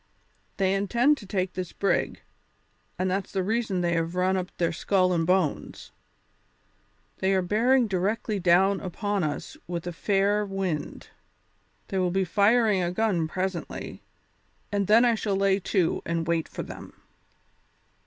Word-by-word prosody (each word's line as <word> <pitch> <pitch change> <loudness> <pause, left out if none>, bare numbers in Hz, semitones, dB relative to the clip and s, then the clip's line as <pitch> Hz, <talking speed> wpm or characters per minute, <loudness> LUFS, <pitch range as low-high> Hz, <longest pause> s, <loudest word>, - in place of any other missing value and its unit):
They 190 -1 +2
intend 235 +9 +2
to 205 - -12
take 185 -2 -2
this 180 -2 -5
brig, 200 - 0 0.8
and 185 +1 0
that's 190 +1 -2
the 190 -1 -1
reason 215 -2 -1
they 170 -1 +1
have 165 +1 -1
run 185 +1 +2
up 185 -1 -2
their 170 -1 +1
skull 185 +1 +1
and 165 -1 0
bones. 180 -5 -1 1.3
They 190 +1 +1
are 190 - +1
bearing 235 +7 +3
directly 205 +2 -1
down 190 +2 +3
upon 200 +1 -2
us 150 -2 -4
with 170 -1 -4
a 175 - -4
fair 200 +3 +1
wind; 190 -6 -4 0.8
they 190 - -1
will 180 -1 +1
be 190 +1 0
firing 210 +2 +3
a 175 - 0
gun 180 -5 0
presently, 185 +1 -4 0.7
and 200 -2 0
then 230 +3 +6
I 240 - +4
shall 215 -3 -1
lay 195 0 +2
to 180 -2 0
and 165 -1 -2
wait 165 -1 0
for - - -6
them." - - -11
190 Hz, 155 wpm, -26 LUFS, 175-205 Hz, 1.3 s, then